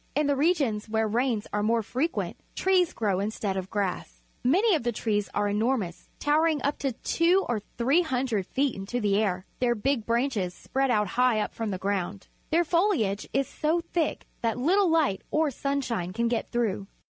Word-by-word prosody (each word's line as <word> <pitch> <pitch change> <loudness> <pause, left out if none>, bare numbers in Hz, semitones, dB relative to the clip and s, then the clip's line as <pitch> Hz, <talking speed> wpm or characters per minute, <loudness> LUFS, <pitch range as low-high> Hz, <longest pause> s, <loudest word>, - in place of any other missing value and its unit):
In 300 +1 +2
the 285 0 +2
regions 275 -9 +1
where 220 0 +1
rains 230 0 0
are 210 - +1
more 225 +2 +2
frequent, 285 - -2 0.2
trees 370 -2 +3
grow 200 -4 0
instead 205 -1 -2
of 190 0 -4
grass. 180 - -3 0.2
Alany 375 - +4
of 310 - 0
the 240 0 0
trees 210 -3 -1
are 205 - +1
enormous, 210 -3 -1
towering 310 +1 +2
up 285 - 0 0.2
two 355 +4 +3
or 240 -3 0 0.2
three 270 +9 +3
hundred 250 - -1
feet 275 -1 0
into 195 +6 -3
the 205 -3 +2
air. 190 -3 0
Their 240 -1 +2
big 240 +1 -1
branches 230 -7 0
spread 270 0 -1
out 210 -4 +2
high 250 -1 +2
up - - -2
from 225 -2 -3
the 190 - -2
ground. 195 0 -3 0.2
Their 335 +2 +3
foliage 335 - +1
is 275 0 +1
so 315 +4 0
thick 330 -3 0 0.2
that 230 0 0
little 360 +9 +3
light 310 -12 +2
or 310 -1 +1
sunshine 245 -10 -2
can 235 +3 0
get 230 -1 -1
through. 210 -5 -1
235 Hz, 180 wpm, -27 LUFS, 205-290 Hz, 0.2 s, Alany